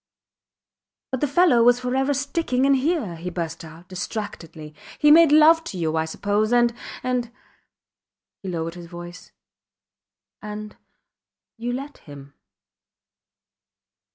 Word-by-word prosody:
But 260 - -3
the 295 - +2
fellow 290 -4 +4
was 245 +1 +5
forever 260 +2 0
sticking 275 -2 -1
in 275 - +4
here, 270 - -1
he 175 +2 -5
burst 165 -2 -5
out, 165 +2 -13
distractedly. 175 -5 -7 0.2
He 295 - +5
made 325 -1 +7
love 315 +2 +6
to 190 - -6
you, 160 -2 -1
I 160 0 0
suppose 205 +6 -1
and, 240 -1 +3 0.3
and... 250 -2 -2 1.1
He 195 - -6
lowered 165 -1 -3
his 175 -1 -10
voice. 175 +1 -10 1.1
And 210 0 -7 0.8
you 240 +1 -4
let 275 +3 -6
him. 140 -2 -13
225 Hz, 125 wpm, -23 LUFS, 170-270 Hz, 1.1 s, made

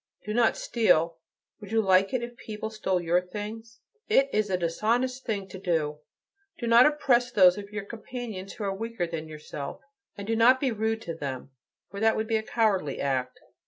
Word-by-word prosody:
Do 210 - -3
not 235 0 +3
steal: 170 -8 +2 0.4
would 205 -1 -11
you 225 - +3
like 195 -2 +4
it 255 -2 -1
if 240 0 -7
people 220 -1 -6
stole 190 -4 0
your 175 +1 +2
things? 215 +5 -8 0.3
It 275 -10 +4
is 210 -1 +1
a 185 - +1
dishonest 235 +10 -1
thing 200 -4 -2
to 190 - -8
do. 160 -5 -1 0.6
Do 240 - -4
not 235 +3 +7
oppress 255 -5 +2
those 185 -5 +6
of 200 0 -8
your 210 -1 -5
companions 220 -3 -7
who - - -7
are 195 -1 -1
weaker 225 -2 -3
than 165 -2 -5
yourself, 150 -2 -7 0.4
and 200 - -6
do 225 +2 0
not 245 +3 +5
be 265 -2 +1
rude 220 +1 -1
to 170 - -4
them, 140 -4 -6 0.4
for 200 - -6
that 220 +1 +3
would 220 - -1
be 225 0 +1
a - - -1
cowardly 210 - 0
act.' 130 -2 -1
210 Hz, 195 wpm, -27 LUFS, 180-230 Hz, 0.6 s, not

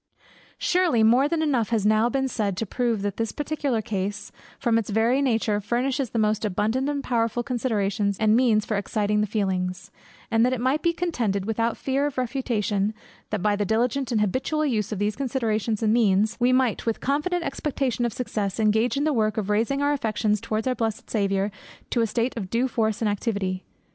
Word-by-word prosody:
Surely 350 -11 +2
more 245 +5 +5
than 315 +1 0
enough 255 -8 +1
has 225 -3 +1
been 210 - +4
now 215 +2 +3 0.2
said 210 -7 -2
to 225 - -1
prove 230 -1 -1
that 205 -1 -2
this 225 -1 -1
particular 290 -6 -2
case, 200 -1 -3 0.3
from 235 -3 +2
its 225 - -5
very 230 +6 +2
nature, 225 -5 +1
furnishes 250 +4 -1
the 230 - -4
most 215 0 +1
abundant 220 +7 0
and 285 -1 -2
powerful 235 0 0
considerations 210 -5 -1
and 215 0 +4
means 230 -4 +3
for 215 - -2
exciting 210 +1 0
the 210 - 0
feelings; 190 -3 -2 0.4
and 225 0 +4
it 255 -1 0
might 260 +5 +1
be 340 - +2
contended, 240 - -1
without 230 +1 0
fear 275 +2 0
of 290 - -7
refutation, 225 -5 -1 0.3
that 210 -4 -2
by 210 -1 +3
the 205 - 0
diligent 240 +5 0
and 220 -3 +2
habitual 265 +9 0
use 220 -6 -1
of 210 - -2
those 205 +2 0
considerations 225 -5 -1
and 215 0 +3
means, 215 -2 +3
we 245 +1 +3
might 255 -3 +2
with 225 - 0
confident 300 +6 0
expectation 270 -4 -2
of 240 - 0
success, 215 -4 -3
engage 220 +4 +2
in 285 - +1
the 305 0 +2
work 215 -2 +1
of 210 -1 -1
raising 235 +7 +1
our 290 0 +2
affections 215 -5 0
towards 220 -1 -2
our 255 - +1
blessed 225 -3 -3
Saviour 200 -1 0 0.4
to 240 - +2
a 225 - +2
state 235 +3 -1
of 200 -5 -5
due 240 +5 +1
force 220 -3 -1
and - - +2
activity. 200 -3 -2
225 Hz, 200 wpm, -25 LUFS, 210-255 Hz, 0.4 s, more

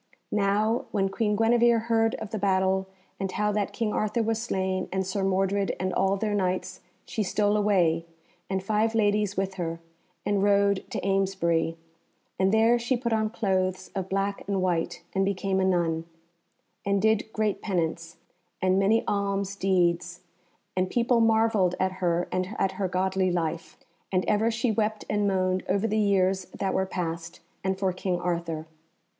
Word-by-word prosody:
Now 210 +3 +1
when 195 -2 0
Queen 210 +1 0
Guenevere 235 +1 +4
heard 225 0 +1
of 220 - -7
the 220 - -3
battle, 190 -1 +1 0.3
and 195 -1 -2
how 210 0 0
that 205 -1 -1
King 225 -3 -2
Arthur 215 +2 0
was 225 0 -1
slain 190 -4 -1
and 190 0 -1
Sir 190 +1 -2
Mordred 195 +1 +1
and 185 +1 -1
all 195 +1 +2
their 210 +1 -1
Knights, 185 -2 -1 0.3
she 220 - -3
stole 205 +1 +1
away, 175 -6 +2 0.4
and 190 -1 -1
five 220 +2 +1
ladies 210 -2 +1
with 195 0 -1
her, 165 0 -3 0.5
and 205 -1 +1
rode 200 -1 +3
to - - -3
Amesbury; 185 -4 +1 0.6
and 190 0 +3
there 225 +2 +4
she 245 +2 0
put 235 -1 -2
on 220 -1 +1
clothes 185 -4 -1
of 190 -2 -4
black 195 +1 -1
and 200 -1 0
white, 175 -3 -1
and 195 - +2
became 195 0 0
a - - +2
nun, 170 -3 +1 0.8
and 200 0 +1
did 220 +1 +1
great 215 -2 -1
penance, 165 -4 -2 0.4
and 185 +1 +2
many 210 +4 +3
alms 200 -1 -1
deeds, 175 -2 +1 0.5
and 185 0 +1
people 235 +1 +2
marvelled 220 -5 +3
at 185 0 +1
her 175 -1 +1
and 185 +3 -2
at 190 - +1
her 190 0 -2
godly 185 +1 0
life. 165 -2 -3 0.3
And 185 -1 +1
ever 215 +2 +2
she 230 +1 0
wept 215 0 -1
and 205 -1 +1
moaned 185 -1 +1
over 200 +3 +1
the 215 -1 0
years 190 -2 +2
that 190 +1 -3
were 190 0 0
past, 170 -2 -4 0.2
and 190 0 0
for 190 -1 0
King 180 -1 -2
Arthur. 170 -3 -2
195 Hz, 170 wpm, -27 LUFS, 185-210 Hz, 0.8 s, Guenevere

